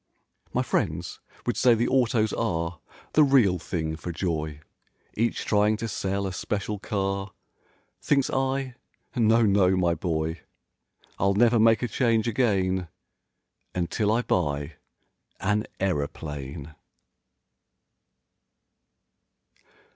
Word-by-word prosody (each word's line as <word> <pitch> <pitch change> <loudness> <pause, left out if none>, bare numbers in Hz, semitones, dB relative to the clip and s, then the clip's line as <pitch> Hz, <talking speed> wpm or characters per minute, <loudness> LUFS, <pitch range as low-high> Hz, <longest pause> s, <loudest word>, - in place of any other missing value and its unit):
My - - 0
friends - - -2 0.3
would 120 - 0
say 125 -2 +5
the 115 +2 +1
autos 120 -4 +2
are 85 -6 -2 0.3
The 155 - +6
real 120 -11 +4
thing 80 -2 -3
for 85 +2 -6
joy; 80 -4 -3 0.5
Each 115 +2 -1
trying 105 +1 +3
to 115 +1 -3
sell 100 -1 -2
a 95 - -3
special 105 +2 -3
car; 100 -1 -2 0.7
Thinks 140 -3 +2
I, 135 0 -1 0.4
"No, 115 -1 +4
no, 100 -3 +4
my 85 -2 +2
boy!" 80 -1 -2 0.8
I'll 100 +1 +2
never 120 +2 +4
make 115 +1 +4
a - - +1
change 115 -1 +1
again 95 -6 +1 0.9
Until 95 +4 0
I 115 +2 +2
buy 75 -5 -1 0.6
an 105 +2 0
aeroplane. 75 -4 -3
100 Hz, 110 wpm, -26 LUFS, 85-115 Hz, 0.9 s, The